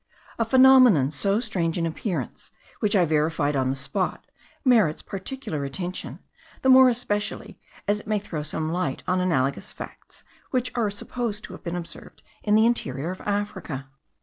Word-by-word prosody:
A 230 - +2
phenomenon 255 - +6
so 195 +7 +1
strange 185 -8 -1
in 170 - 0
appearance, 165 - -4 0.3
which 210 0 +1
I 180 -3 +5
verified 150 -1 +1
on 130 -1 +1
the 135 - 0
spot, 140 +8 -2 0.4
merits 220 - +3
particular 195 - -4
attention; 175 +7 -5 0.5
the 265 - +3
more 260 0 +8
especially 215 -4 -3 0.3
as 210 0 +2
it 210 - -14
may 215 -1 +1
throw 180 -6 -4
some 155 +1 -3
light 170 -6 -2
on 185 0 +1
analogous 140 -7 0
facts, - - -11 0.3
which 250 -1 0
are 230 -4 +1
supposed 210 +1 -4
to - - -9
have - - -10
been 170 -1 -3
observed 170 -1 -9 0.2
in 210 0 +2
the 220 +1 +5
interior 160 - 0
of 185 - -8
Africa. 200 -10 -3
185 Hz, 165 wpm, -25 LUFS, 155-220 Hz, 0.5 s, more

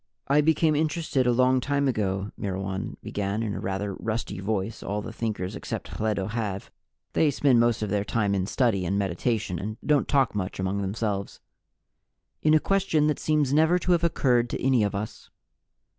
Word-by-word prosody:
"I 145 +2 +4
became 155 0 +3
interested 150 -4 0
a - - +5
long 130 +1 +3
time 140 +1 0
ago," 100 -4 -1
Myrwan 95 -1 -4
began 100 +2 -2
in 105 -3 -2
the - - -4
rather 95 +1 -3
rusty 110 -1 -4
voice 100 +1 -2
all 105 +1 -3
the 115 - -7
Thinkers 105 -5 -3
except - - -5
Hledo 105 -3 -1
have 105 -4 -3 0.4
they 155 - +3
spend 135 -3 +3
most 120 -1 +2
of 105 - -3
their 100 -1 +1
time 105 -2 0
in 95 -1 0
study 105 -4 +1
and 95 +3 0
meditation, 100 -1 -1
and 110 +4 -5
don't 150 -2 +3
talk 135 -4 +2
much 100 -2 -3
among 95 +2 -1
themselves 100 0 -3 1.0
"in 155 0 +4
a - - +6
question 190 -5 +1
that 150 -1 +1
seems 150 -3 +1
never 160 +4 +4
to 180 - -1
have 170 -1 +3
occurred 125 -7 +2
to - - -4
any 130 -3 +3
of 100 -1 0
Us. 105 +2 -6
110 Hz, 185 wpm, -26 LUFS, 100-140 Hz, 1.0 s, a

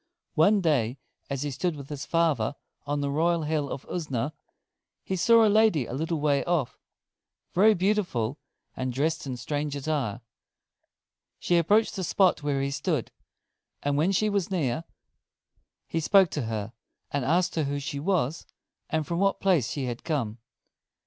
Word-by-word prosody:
One 200 +6 +4
day 135 -7 +1 0.3
as 140 0 -2
he 145 - -2
stood 170 +5 -1
with 140 -2 -9
his 145 -2 -6
father 165 -4 +1 0.3
on 145 0 -1
the 140 0 -1
royal 165 +3 +1
Hill 150 -2 -1
of 135 - -5
Usna, 150 -4 -2 0.7
he 190 - -2
saw 230 +5 +5
a - - +5
lady 215 - +4
a - - -7
little 160 +4 -1
way 145 -2 +2
off, 160 -8 -1 0.7
very 210 +4 +5
beautiful, 175 - 0 0.4
and 130 0 -2
dressed 150 +4 -1
in 130 -2 -4
strange 145 +2 -3
attire. 135 -6 -2 1.2
She 175 - +1
approached 205 +7 +3
the 190 - -3
spot 185 0 +3
where 140 -2 0
he 140 - -1
stood; 150 -2 -1 0.7
and 145 0 +1
when 160 +6 +2
she 215 +3 +2
was 200 -4 0
near, 160 -5 -1 1.0
he 165 - -2
spoke 190 +2 +5
to 135 -7 -3
her, 110 0 -4 0.4
and 145 -2 -1
asked 175 +7 +2
who 145 -3 -1
she 140 0 -4
was, 165 -3 -1 0.4
and 155 -1 0
from 170 +3 -2
what 195 0 +2
place 170 - +2
she 140 -3 -3
had 120 -1 -5
come. 125 -9 -2
150 Hz, 160 wpm, -27 LUFS, 140-175 Hz, 1.2 s, saw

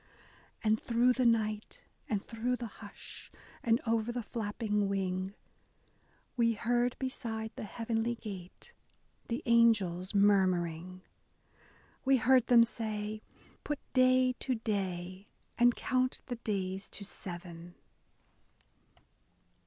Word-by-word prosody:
And 220 0 +2
through 240 +1 +3
the 255 -1 +2
night, 215 -2 0 0.3
and 210 -4 -1
through 240 +2 -1
the 245 - -5 0.2
hush, 205 - -11 0.3
and 230 0 +3
over 230 0 +1
the 240 -1 -3
flapping 210 -2 -1
wing, 190 0 -2 1.0
We 230 -2 +3
heard 240 +2 +1
beside 225 -4 -4
the - - -5
heavenly 230 +2 -1
gate 190 -6 -9 0.5
the 240 +6 -3
angels 210 -6 +3
murmuring: 185 -3 +2 0.5
— - - -30
We 270 0 +4
heard 250 0 +4
them 235 -2 +7
say, 215 -2 -3 0.2
*' - - -28
Put 295 - -2 0.2
day 255 0 +4
to 260 - -1
day, 190 -3 -3 0.3
and 240 0 +5
count 255 0 0
the 245 -2 -4
days 195 -4 -3
to 200 - -6
seven. 175 -2 -8
220 Hz, 115 wpm, -32 LUFS, 195-240 Hz, 1.0 s, them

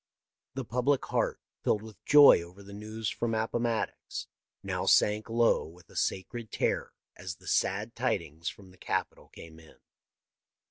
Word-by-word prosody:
The 135 -2 -3
public 125 +4 +1
heart, - - 0 0.2
filled 105 - +1
with 110 -5 -13
joy 145 -10 +8
over 90 +4 -12
the 100 +1 -11
news 110 +1 -4
from 115 -1 -1
Appomattox, 115 +1 -2 0.4
now - - -2
sank 105 +2 +4
low 115 -5 +3
with 85 +2 -17
a - - -16
sacred 110 +4 -2
terror - - -1 0.2
as 90 -2 -6
the - - -20
sad 105 +4 0
tidings 85 - -2
from 95 -2 -13
the 95 - -20
Capitol - - -3
came 80 -1 -13
in. 80 -2 -18
105 Hz, 150 wpm, -30 LUFS, 90-115 Hz, 0.4 s, joy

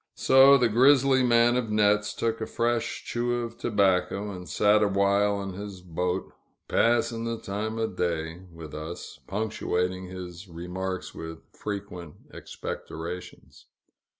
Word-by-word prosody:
So 135 +1 +7
the 125 -2 +3
grizzly 130 +3 +5
man 120 -1 +4
of 125 -3 -1
nets 105 0 +2
took 115 -1 -1
a 110 - -2
fresh 120 0 -1
chew 120 0 -1
of 115 0 -8
tobacco, 100 -1 +1
and 90 -2 -8
sat 105 0 +4
a 105 - +4
while 100 +1 +2
in 95 -1 -5
his 100 -1 -8
boat, 90 +2 -2 0.3
"pass'n' 115 0 +2
th' 115 -1 -4
time 110 +3 -3
o' 115 - +1
day" 85 -4 -2
with 80 -2 -10
us, 80 +3 -7
punctuating 95 -3 -2
his 90 0 -8
remarks 90 +2 -5
with 80 0 -8
frequent 95 -6 -6 0.2
expectorations. 85 +3 -8
100 Hz, 135 wpm, -27 LUFS, 90-115 Hz, 0.3 s, So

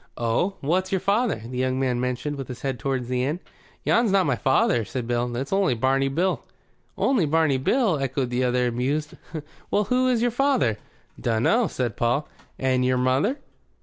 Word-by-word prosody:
"Oh? 120 - 0
What's 185 +6 0
your 190 - +2
father?" 200 - 0
The 125 +1 -5
young 130 0 0
man 125 -2 0
motioned 125 +3 -2
with 135 -3 -6
his 125 - -8
head 135 -3 -2
toward 130 +1 -1
the 125 +1 -1
inn. 150 +6 -1 0.4
"Yon's 235 -3 +3
not 195 -2 +3
my 140 -4 +1
father," 120 -2 +2
said 120 +2 -5
Paul. 120 0 -1
"It's 135 +8 -3
only 195 -9 +2
Barney 135 +3 +2
Bill." 175 +7 0 0.5
"Only 235 - +2
Barney 150 -3 +2
Bill?" 205 - +2
echoed 135 -2 -1
the 125 +1 0
other, 125 0 +2
amused. 140 +6 -1 0.6
"Well, 210 - +2
who 250 +5 +1
is 240 -2 +2
your 245 - +2
father?" 220 - +1 0.4
"Dunno," 120 - +2
said 125 -8 -3
Paul. 120 +6 +1 0.3
"And 130 -1 +1
your 130 0 +2
mother?" 130 - +1
135 Hz, 180 wpm, -24 LUFS, 125-185 Hz, 0.6 s, Yon's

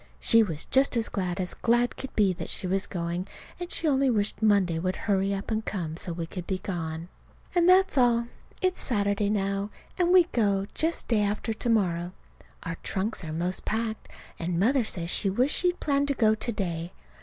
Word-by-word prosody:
She 230 - +5
was 165 -8 -2
just 265 -2 +3
as 230 - 0
glad 185 -3 -2
as 180 -1 -1
glad 240 +1 +1
could 270 - -8
be 200 -3 +3
that 170 -2 -7
she - - -4
was 190 +2 0
going, 175 +1 -3 0.3
only 355 - -4
she 275 -6 +1
wished 210 -3 0
Monday 200 -6 +3
would 185 +2 -1
hurry 195 -1 0
up 195 +2 -3
and 220 0 0
come 170 -8 -4
so 175 +1 -4
we 165 0 -4
could 175 +1 -7
be 190 - -1
gone. 165 -3 -4 0.5
And 350 0 +4
that's 375 -5 +5
all. 235 -1 +4 0.4
It's 370 0 +1
Saturday 205 -2 +1
now, 200 0 -1 0.3
and 355 -1 +3
we 365 -1 +8
go 200 -4 +1
just 325 +1 -1
day 225 -3 +2
after 210 +2 -1
to 230 +2 -2
morrow. 180 -5 +1 0.5
Our 165 0 -4
trunks 195 +1 -2
are 160 - -5
'most 175 +4 -1
packed, 220 0 -3 0.3
and 170 0 -1
Mother 250 +6 +3
says 175 -5 -3
she 200 - +1
wishes 250 +9 +2
she'd 355 0 +1
planned 280 -1 +1
to 280 - 0
go 220 -3 +4
to 220 +2 -2
day. 175 -4 -3
205 Hz, 200 wpm, -27 LUFS, 180-240 Hz, 0.5 s, we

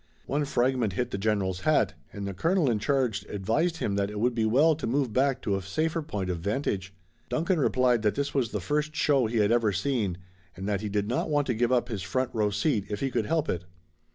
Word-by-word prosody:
One 145 +1 0
fragment 125 -6 +1
hit 120 +7 -2
the 100 - -3
General's 95 -3 0
hat 155 +8 +2 0.2
and 100 -1 -6
the 100 - -4
colonel 165 - +2
in 110 - 0
charge 125 -1 0
advised 130 - 0
him 100 - -1
that 100 0 0
it 105 0 -5
would 120 +3 +2
be 115 -2 +1
well 145 +8 +5
to - - -3
move 130 -1 0
back 135 +1 +1
to 100 - +1
a 95 - -2
safer 155 - -1
point 105 -11 -4
of 85 - -3
vantage. 100 -1 -2 0.4
Duncan 170 +2 +1
replied 125 -4 +3
that 105 -1 +1
this 140 0 -2
was 130 -5 +1
the - - -3
first 150 +1 -1
show 140 -6 +3
he 115 +1 -2
had 105 0 +3
ever 115 -3 +3
seen 100 -3 -1 0.4
and 95 +2 -5
that 105 -2 0
he 105 - -3
did 100 0 -1
not 125 +7 -1
want 145 -1 +2
to 125 - 0
give 120 +2 +1
up 125 -1 +2
his 110 -6 -4
front 125 +8 -1
row 105 -2 +1
seat 105 +1 0
if 105 -1 -3
he 135 -1 -1
could 110 - -1
help 160 -1 +1
it. 90 0 -2
120 Hz, 240 wpm, -27 LUFS, 100-140 Hz, 0.4 s, well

